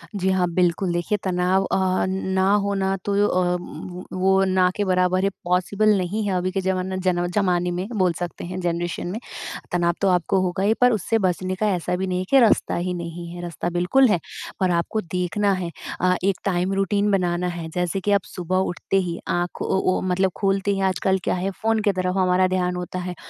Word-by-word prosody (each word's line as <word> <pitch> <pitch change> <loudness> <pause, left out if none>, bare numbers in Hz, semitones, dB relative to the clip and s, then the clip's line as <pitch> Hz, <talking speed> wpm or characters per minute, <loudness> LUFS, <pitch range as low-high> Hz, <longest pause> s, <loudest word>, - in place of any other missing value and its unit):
जी, 190 -1 0
हाँ, 185 -1 +2
बिल्कुल, 180 +1 +1
देखिए 175 +4 0
तनाव 185 +1 +1
अ, 185 -1 +1
ना 190 0 0
होना 195 -1 0
तो 205 - 0
अ, 180 -2 +1
व 180 0 -8 0.2
वो 190 +1 +4
ना 185 -1 +3
के 205 - 0
बराबर 185 0 +2
है 195 - +3
पॉसिबल 185 +4 +1
नहीं 195 +4 -2
है, 195 - 0
अभी 185 +1 -1
के 195 - -1
ज़माना 190 0 -1
ज़नव 175 -1 +1
ज़माने 180 -3 +1
में 180 +2 -3
बोल 185 -3 +2
सकते 175 -1 -5
हैं 180 +1 -5
जनरेशन 175 0 -2
में। 195 +5 -4 0.5
तनाव 175 -1 +2
तो 200 - +3
आपको 180 +1 +2
होगा 185 +1 -1
ही 210 +2 +4
पर 250 0 +6
उससे 225 +1 +1
बचने 185 +1 -1
का 215 +3 0
ऐसा 175 0 -2
भी 190 +1 -2
नहीं 180 -1 -1
है 185 - -3
कि 275 - +6
रास्ता 230 -4 +3
ही 180 +1 -2
नहीं 170 0 -6
है, 175 - -7
रास्ता 175 0 -4
बिल्कुल 180 +10 +4
है 180 - +2 0.4
और 185 -1 +3
आपको 175 +5 0
देखना 180 +3 -1
है 180 -2 -3 0.3
अ, 180 0 +3
एक 195 -1 +2
टाइम 185 0 0
रूटीन 200 +1 +1
बनाना 180 -2 +1
है 170 -2 -4
जैसे 180 +1 0
कि 205 +2 -1
आप 200 -2 +3
सुबह 180 0 -3
उठते 180 +2 -1
ही 170 - -4
आँख 175 0 -2
ओ - - 0 0.2
ओ - - -1
मतलब 185 +1 +1
खोलते 195 0 +1
ही 195 - -1
आजकल 190 +1 +1
क्या - - 0
है 185 +2 -2
फ़ोन 225 0 +2
की 205 - +2
तरफ 185 -1 -1
हमारा 185 0 +3
ध्यान 180 -1 0
होता 180 +1 -4
है, 180 0 -5
185 Hz, 215 wpm, -23 LUFS, 180-195 Hz, 0.5 s, पर